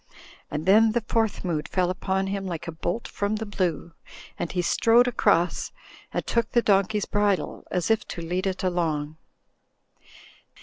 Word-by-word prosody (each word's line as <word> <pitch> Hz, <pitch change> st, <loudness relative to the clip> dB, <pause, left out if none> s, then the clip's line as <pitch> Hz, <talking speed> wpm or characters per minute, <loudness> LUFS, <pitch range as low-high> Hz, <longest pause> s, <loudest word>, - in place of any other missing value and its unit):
And 150 Hz, +1 st, -4 dB
then 215 Hz, +3 st, +5 dB
the 235 Hz, -2 st, -1 dB
Fourth 225 Hz, -4 st, 0 dB
Mood 160 Hz, -4 st, -1 dB
fell 180 Hz, -1 st, +1 dB
upon 190 Hz, +1 st, -1 dB
him 195 Hz, 0 st, -3 dB
like 170 Hz, -2 st, -5 dB
a -, -, -3 dB
bolt 175 Hz, +7 st, -3 dB
from 205 Hz, +1 st, -2 dB
the 220 Hz, +1 st, -4 dB
blue, 175 Hz, -5 st, -2 dB, 0.5 s
and 170 Hz, -, -2 dB
he 180 Hz, -1 st, -1 dB
strode 230 Hz, +7 st, +4 dB
across 175 Hz, -7 st, +1 dB, 0.4 s
and -, -, -2 dB
took 235 Hz, -1 st, 0 dB
the 240 Hz, -, +4 dB
donkey's 200 Hz, +1 st, +2 dB
bridle, 205 Hz, -2 st, 0 dB
as 180 Hz, +3 st, 0 dB
if 220 Hz, -, +1 dB
to 170 Hz, -, -6 dB
lead 180 Hz, +3 st, -1 dB
it 190 Hz, 0 st, -3 dB
along. 160 Hz, -4 st, -1 dB
190 Hz, 165 wpm, -25 LUFS, 175-215 Hz, 0.5 s, then